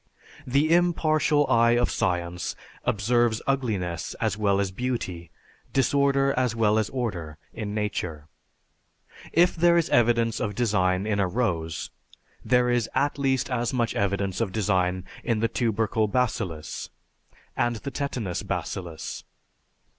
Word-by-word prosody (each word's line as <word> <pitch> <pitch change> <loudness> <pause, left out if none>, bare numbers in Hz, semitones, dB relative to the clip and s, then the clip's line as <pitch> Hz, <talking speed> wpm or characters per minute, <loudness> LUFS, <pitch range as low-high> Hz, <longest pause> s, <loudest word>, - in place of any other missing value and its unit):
The 145 +5 +3
impartial 155 -4 +3
eye 115 -2 +4
of 120 - +1
science 90 -1 -1 0.3
observes 115 +2 +2
ugliness 105 - -1
as - - -1
well 100 -2 +1
as 100 -2 0
beauty, 95 -7 -3 0.4
disorder 140 0 +3
as 125 -2 +1
well 110 -1 +3
as 110 - -1
order, 90 - -4 0.2
in 105 -2 -4
nature. 90 -8 -3 1.1
If 175 +2 +4
there 170 +1 +4
is 170 - +1
evidence 115 -1 +3
of 105 -1 -2
design 95 -5 +1
in 105 -1 0
a 100 - +2
rose, 90 -7 -2 0.5
there 125 +2 +3
is 120 -2 +1
at 145 +1 +1
least 135 -1 +1
as 120 0 -1
much 120 -2 0
evidence 100 0 -1
of 105 -5 0
design 95 -3 0 0.2
in 115 -2 0
the 115 - +2
tubercle 110 -1 0
bacillus, 100 -9 -2 0.7
and 120 0 +1
the 140 +5 -6
tetanus 120 -11 -3
bacillus. 85 -4 -5
115 Hz, 130 wpm, -26 LUFS, 95-125 Hz, 1.1 s, eye